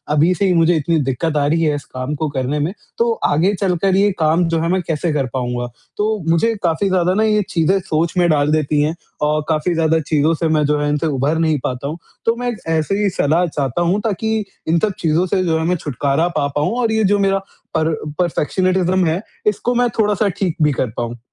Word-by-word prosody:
अभी 160 Hz, +5 st, +4 dB
से 200 Hz, -, 0 dB
ही 185 Hz, -, +3 dB
मुझे 165 Hz, 0 st, +3 dB
इतनी 160 Hz, +1 st, +1 dB
दिक्कत 140 Hz, +4 st, -1 dB
आ 145 Hz, -, +2 dB
रही 165 Hz, +2 st, +1 dB
है 150 Hz, -2 st, +2 dB
इस 145 Hz, -, -7 dB
काम 130 Hz, +3 st, -5 dB
को 155 Hz, +1 st, -2 dB
करने 140 Hz, +1 st, -2 dB
में, 155 Hz, +6 st, -1 dB, 0.2 s
तो 235 Hz, 0 st, +2 dB, 0.2 s
आगे 170 Hz, +7 st, +2 dB
चलकर 190 Hz, 0 st, +1 dB
ये 200 Hz, +1 st, +3 dB
काम 160 Hz, +2 st, +3 dB
जो 165 Hz, 0 st, 0 dB
है, 165 Hz, -, 0 dB
मैं 185 Hz, +1 st, +1 dB
कैसे 165 Hz, 0 st, -2 dB
कर 140 Hz, -3 st, 0 dB
पाऊँगा? 125 Hz, -1 st, -2 dB, 0.3 s
तो 210 Hz, -2 st, -1 dB
मुझे 170 Hz, +8 st, +3 dB
काफ़ी 170 Hz, +3 st, +1 dB
ज़्यादा 180 Hz, -1 st, +2 dB
ना 215 Hz, +3 st, +2 dB
ये 210 Hz, -1 st, +3 dB
चीज़ें 175 Hz, +3 st, +2 dB
सोच 165 Hz, -2 st, -1 dB
में 175 Hz, -1 st, +4 dB
डाल 150 Hz, -1 st, +2 dB
देती 150 Hz, -1 st, +1 dB
है 150 Hz, +2 st, +1 dB, 0.3 s
और 150 Hz, +1 st, +1 dB
काफ़ी 160 Hz, +2 st, +1 dB
ज़्यादा 160 Hz, -1 st, +2 dB
चीज़ों 155 Hz, +1 st, +1 dB
से 165 Hz, +1 st, -1 dB
मैं 155 Hz, -1 st, +2 dB
जो 150 Hz, 0 st, +1 dB
है 145 Hz, 0 st, 0 dB
इनसे 150 Hz, +2 st, 0 dB
उभर 145 Hz, +2 st, 0 dB
नहीं 160 Hz, -2 st, +2 dB
पाता 125 Hz, +2 st, -3 dB
हूँ। 155 Hz, +3 st, -4 dB, 0.3 s
तो 230 Hz, -, +2 dB
मैं 245 Hz, +1 st, -4 dB
एक 240 Hz, -, -4 dB
ऐसे 160 Hz, +4 st, 0 dB
ही 200 Hz, -, +3 dB
सलाह 170 Hz, 0 st, +1 dB
चाहता 145 Hz, -1 st, -2 dB
हूँ 175 Hz, +4 st, +2 dB
ताकि 220 Hz, +1 st, -1 dB, 0.2 s
इन 165 Hz, +1 st, +3 dB
सब 210 Hz, +3 st, 0 dB
चीज़ों 165 Hz, +2 st, +1 dB
से 185 Hz, +1 st, +1 dB
जो 165 Hz, -3 st, +1 dB
है -, -, -1 dB
मैं 180 Hz, +2 st, +1 dB
छुटकारा 140 Hz, +3 st, 0 dB
पा 140 Hz, -, +1 dB
पाऊँ 150 Hz, 0 st, +1 dB
और 230 Hz, -2 st, +1 dB
ये 220 Hz, 0 st, +2 dB
जो 205 Hz, 0 st, +3 dB
मेरा 195 Hz, 0 st, +2 dB, 0.4 s
पर 160 Hz, 0 st, +1 dB, 0.3 s
पर्फेक्शनिज्म 185 Hz, +2 st, +1 dB
है, 165 Hz, +3 st, 0 dB, 0.3 s
इसको 250 Hz, -12 st, +1 dB
मैं 245 Hz, 0 st, +2 dB
थोड़ा-सा 210 Hz, -1 st, +2 dB
ठीक 180 Hz, -5 st, -1 dB
भी 150 Hz, -1 st, +4 dB
कर 130 Hz, -2 st, -1 dB
पाऊँ। 120 Hz, 0 st, -4 dB
165 Hz, 235 wpm, -18 LUFS, 150-185 Hz, 0.4 s, अभी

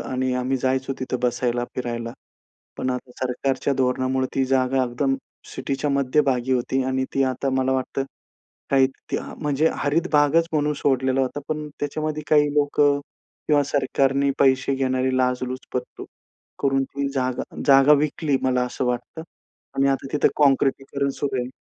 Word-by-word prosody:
आणि 130 Hz, 0 st, 0 dB
आम्ही 125 Hz, +1 st, 0 dB
जायचो 130 Hz, +1 st, 0 dB
तिथे 130 Hz, 0 st, -2 dB
बसायला, 120 Hz, 0 st, 0 dB
फिरायला, 120 Hz, -2 st, -4 dB, 0.6 s
पण 130 Hz, -, -1 dB
आता 125 Hz, 0 st, -4 dB
सरकारच्या 130 Hz, +2 st, -1 dB
धोरणामुळे 130 Hz, 0 st, 0 dB
ती 135 Hz, -, +2 dB
जागा 130 Hz, 0 st, +2 dB
एकदम 130 Hz, +3 st, 0 dB, 0.4 s
सिटीच्या 140 Hz, +2 st, -2 dB
मध्यभागी 135 Hz, -2 st, +1 dB
होती 130 Hz, +1 st, 0 dB
आणि 130 Hz, 0 st, 0 dB
ती 135 Hz, -, +3 dB
आता 130 Hz, +1 st, -1 dB
मला 130 Hz, 0 st, +1 dB
वाटतं. 130 Hz, +1 st, -1 dB, 0.7 s
काही 135 Hz, -1 st, +5 dB, 0.2 s
त्या -, -, -2 dB, 0.2 s
म्हणजे 150 Hz, +1 st, +2 dB
हरित 160 Hz, +5 st, 0 dB
भागच 150 Hz, +3 st, +4 dB
म्हणून 150 Hz, -1 st, +1 dB
सोडलेला 130 Hz, -1 st, +1 dB
होता, 130 Hz, +2 st, -2 dB
पण 150 Hz, -1 st, -3 dB
त्याच्यामध्ये 155 Hz, +1 st, -2 dB
काही 150 Hz, -1 st, +4 dB
लोकं 145 Hz, -1 st, +3 dB, 0.5 s
किंवा 145 Hz, -2 st, +4 dB
सरकारने 140 Hz, 0 st, +1 dB
पैसे 130 Hz, 0 st, +3 dB
घेणारी 130 Hz, -1 st, 0 dB
लाचलुचपत 125 Hz, 0 st, -2 dB, 0.6 s
करून 135 Hz, -1 st, +2 dB
ती 140 Hz, +1 st, -3 dB
जागा 130 Hz, -2 st, -1 dB, 0.2 s
जागा 135 Hz, +1 st, +7 dB
विकली, 150 Hz, 0 st, +2 dB
मला 125 Hz, -1 st, +2 dB
असं 125 Hz, -, -3 dB
वाटतं 125 Hz, +6 st, -3 dB, 0.5 s
आणि 135 Hz, 0 st, +3 dB
आता 135 Hz, 0 st, -1 dB
तिथे 150 Hz, -, +3 dB
काँक्रिटीकरण 140 Hz, -1 st, +2 dB
सुरू 140 Hz, -2 st, -1 dB
आहे. 125 Hz, -, -4 dB
135 Hz, 145 wpm, -23 LUFS, 130-140 Hz, 0.7 s, जागा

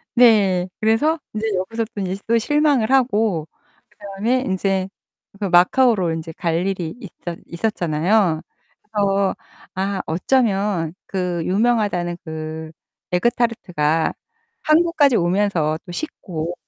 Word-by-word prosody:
네. 200 Hz, -7 st, +5 dB
그래서 230 Hz, +10 st, +2 dB, 0.2 s
이제 215 Hz, +1 st, -2 dB
여기서 225 Hz, +5 st, -2 dB
또 200 Hz, -, -3 dB
이제 190 Hz, +1 st, -3 dB
또 230 Hz, +1 st, +3 dB
실망을 285 Hz, -2 st, +2 dB
하고 220 Hz, -, +2 dB, 0.4 s
그다음에 210 Hz, +6 st, -2 dB
이제 190 Hz, 0 st, 0 dB, 0.5 s
그 205 Hz, -, -2 dB
마카오로 185 Hz, 0 st, +4 dB
이제 160 Hz, 0 st, -6 dB
갈 170 Hz, +2 st, -1 dB
일이 180 Hz, -4 st, -3 dB
있었 175 Hz, -5 st, -8 dB
있었잖아요. 170 Hz, -1 st, +1 dB, 0.4 s
그래서 200 Hz, -2 st, 0 dB, 0.4 s
아 195 Hz, +1 st, -2 dB
어쩌면 195 Hz, -3 st, +1 dB
그 180 Hz, -3 st, -2 dB
유명하다는 200 Hz, -4 st, +1 dB
그 160 Hz, 0 st, -6 dB, 0.4 s
에그 180 Hz, +7 st, +2 dB
타르트가 165 Hz, -10 st, 0 dB, 0.5 s
항구까지 310 Hz, -5 st, +4 dB
오면서 175 Hz, -4 st, +1 dB
또 175 Hz, -, -9 dB
식고 175 Hz, -, -5 dB
195 Hz, 255 characters per minute, -21 LUFS, 175-225 Hz, 0.5 s, 네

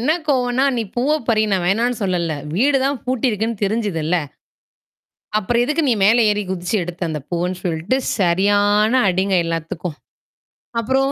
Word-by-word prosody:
என்ன 250 Hz, -, +1 dB, 0.2 s
கோவன்னா, 255 Hz, -1 st, +2 dB
"நீ 235 Hz, -, 0 dB
பூவை 285 Hz, +5 st, +2 dB
பறி! 220 Hz, -2 st, +3 dB
நான் 185 Hz, -2 st, +1 dB
வேணாம்ன்னு 230 Hz, +5 st, +1 dB
சொல்லல்ல. 175 Hz, -4 st, 0 dB, 0.2 s
வீடு 275 Hz, +6 st, +3 dB
தான் 275 Hz, 0 st, 0 dB
பூட்டி 255 Hz, 0 st, 0 dB
இருக்குன்னு 220 Hz, 0 st, -2 dB
தெரிஞ்சதுல்ல! 195 Hz, -6 st, 0 dB, 1.2 s
அப்புறம் 235 Hz, +3 st, +1 dB
எதுக்கு 300 Hz, +6 st, 0 dB
நீ -, -, +4 dB
மேல 225 Hz, +4 st, +5 dB
ஏறி 210 Hz, 0 st, 0 dB
குதிச்சு 180 Hz, +2 st, -2 dB
எடுத்த?" 175 Hz, +1 st, -8 dB
அந்த 155 Hz, -1 st, -3 dB
பூவுன்னு 180 Hz, +1 st, -2 dB
சொல்ட்டு, 175 Hz, +8 st, -1 dB, 0.2 s
சரியான 205 Hz, +4 st, +3 dB, 0.2 s
அடிங்க 190 Hz, +1 st, +1 dB
எல்லாத்துக்கும். 165 Hz, 0 st, -4 dB, 0.8 s
அப்புறம் 265 Hz, +4 st, +1 dB
205 Hz, 145 wpm, -20 LUFS, 180-245 Hz, 1.2 s, மேல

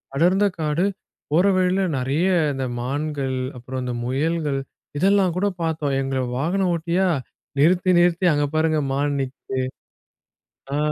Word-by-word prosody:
அடர்ந்த 185 Hz, +6 st, +3 dB
காடு. 155 Hz, +4 st, +1 dB, 0.5 s
போற 175 Hz, +5 st, +4 dB
வழியில 185 Hz, +1 st, +2 dB
நிறைய 140 Hz, +8 st, 0 dB, 0.3 s
இந்த 135 Hz, -1 st, -2 dB, 0.2 s
மான்கள், 140 Hz, 0 st, -2 dB, 0.2 s
அப்புறம் 130 Hz, +1 st, -5 dB
இந்த 125 Hz, -, -2 dB
முயல்கள் 145 Hz, +2 st, 0 dB, 0.4 s
இதெல்லாம் 190 Hz, +1 st, +3 dB
கூடப் 185 Hz, -1 st, -1 dB
பார்த்தோம். 155 Hz, -4 st, -1 dB
எங்களை 135 Hz, -1 st, -1 dB
வாகனம் 180 Hz, +5 st, +1 dB
ஓட்டியா 170 Hz, +3 st, +1 dB, 0.5 s
நிறுத்தி 175 Hz, +4 st, +4 dB
நிறுத்தி, 175 Hz, +1 st, +3 dB
"அங்கே 145 Hz, 0 st, +1 dB
பாருங்கள் 155 Hz, -3 st, +2 dB
மான் 145 Hz, 0 st, 0 dB
நிக்குது" 130 Hz, 0 st, -5 dB, 1.2 s
ஆ -, -, +1 dB
155 Hz, 125 wpm, -22 LUFS, 135-180 Hz, 1.2 s, போற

